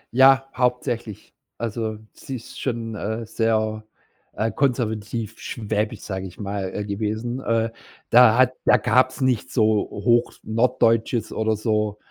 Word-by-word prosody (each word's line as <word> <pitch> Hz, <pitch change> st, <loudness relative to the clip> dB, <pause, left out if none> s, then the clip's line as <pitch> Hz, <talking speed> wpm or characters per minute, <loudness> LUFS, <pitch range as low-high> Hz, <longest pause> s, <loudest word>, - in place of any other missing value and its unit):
Ja, 135 Hz, +1 st, +6 dB
hauptsächlich. 125 Hz, -4 st, -2 dB, 0.2 s
Also 110 Hz, -1 st, -3 dB, 0.2 s
sie 135 Hz, -, -7 dB
ist 115 Hz, -, -9 dB
schon, 115 Hz, -3 st, -3 dB
äh, 110 Hz, +2 st, -4 dB
sehr, 110 Hz, -1 st, 0 dB, 0.5 s
äh, 110 Hz, +2 st, -1 dB
konservativ, 115 Hz, -4 st, -2 dB
schwäbisch, 105 Hz, -1 st, -3 dB
sage 95 Hz, -1 st, -5 dB
ich 90 Hz, -, -14 dB
mal, 100 Hz, 0 st, -3 dB
gewesen, 110 Hz, +4 st, -3 dB
äh. 115 Hz, -1 st, 0 dB, 0.4 s
Da 120 Hz, -1 st, +7 dB
hat 130 Hz, 0 st, +4 dB
da -, -, +6 dB
gab's 130 Hz, +3 st, +2 dB
nicht 130 Hz, -1 st, 0 dB
so 115 Hz, -5 st, +2 dB, 0.3 s
Hoch 120 Hz, +4 st, +1 dB
Norddeutsches 115 Hz, 0 st, +1 dB
oder 110 Hz, 0 st, 0 dB
so 105 Hz, -1 st, -1 dB
115 Hz, 130 wpm, -23 LUFS, 110-125 Hz, 0.5 s, Da